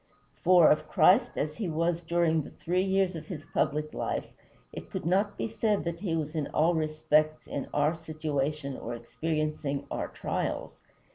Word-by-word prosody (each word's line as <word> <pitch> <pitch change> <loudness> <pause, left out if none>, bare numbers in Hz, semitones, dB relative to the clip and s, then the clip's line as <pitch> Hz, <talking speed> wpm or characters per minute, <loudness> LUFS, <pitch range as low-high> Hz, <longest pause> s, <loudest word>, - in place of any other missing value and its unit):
For, 180 -2 +7
of 150 - +1
Christ 240 +7 +5
as 150 +1 -2
he 210 -6 -2
was 165 +2 0
during 165 -1 +2
the - - -8
three 180 +2 -1
years 190 -1 +1
of 160 - -7
his 155 -5 -7
public 150 +1 -1
life, - - -2 0.5
it - - -8
could - - -5
not 200 +4 +1
be - - -1
said 220 -2 0
that 170 0 -3
he 170 -4 -1
was 155 -1 -2
in 155 -3 -1
all 165 +3 +2
respects 155 -1 +1
in 140 - -4
our 150 +2 +2
situation 155 -3 -3
or 120 -1 -5
experiencing 150 +3 -2
our - - -2
trials. - - -3
160 Hz, 170 wpm, -29 LUFS, 150-175 Hz, 0.5 s, For